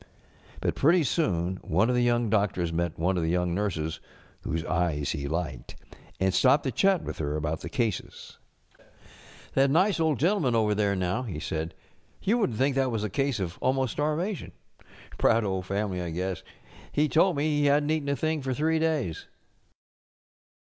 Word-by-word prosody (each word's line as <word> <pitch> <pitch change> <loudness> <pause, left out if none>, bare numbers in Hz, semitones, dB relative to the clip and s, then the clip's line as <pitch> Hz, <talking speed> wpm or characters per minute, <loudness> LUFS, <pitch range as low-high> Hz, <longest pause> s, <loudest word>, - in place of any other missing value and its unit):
But - - 0
pretty 165 +4 +4
soon 95 - 0
one 90 +5 +1
of 125 - +1
the 125 - +2
young 120 -1 +2
doctors 95 -5 +1
met 85 0 -1
one 90 +3 +1
of - - 0
the 80 - 0
young 90 0 0
nurses 85 -5 -2 0.4
whose 80 +3 -3
eyes 80 -5 0
he 70 -3 -3
liked, 80 -5 -4 0.4
and 95 -1 +1
stopped 140 +6 +4
to 130 - -1
chat 195 +2 +2
with - - -6
her 75 -1 -2
about 75 +1 -2
the - - -6
cases. 115 -4 -3 1.2
ŌĆśŌĆśThat 135 0 +4
nice 185 +6 +3
old 160 -4 +2
gentleman 160 - +2
over 110 -2 +2
there, 100 -1 +1
now,*^ 95 +7 -1
he 85 - -4
said, 80 +1 -4 0.5
ŌĆ£you 230 +5 +3
wouldn't 125 - 0
think 135 +2 +2
that 135 -1 +2
was 110 -3 -2
a 105 - -3
case 135 0 0
of 90 -2 -4
almost 130 -2 +1
starvation. 155 +7 -2 0.7
Proud 115 0 +4
old 95 -2 -2
family, 100 -2 -2
I 85 - -4
guess. 90 +1 -3 0.5
He 150 +1 +2
told 165 +5 +3
me 150 0 +1
he 145 - +3
hadnŌĆÖt 145 +1 +3
eaten 155 -3 -1
a 140 - +1
thing 155 +1 -1
for 130 -1 -2
three 160 +3 +1
days. 155 - -1
110 Hz, 180 wpm, -27 LUFS, 90-145 Hz, 1.2 s, pretty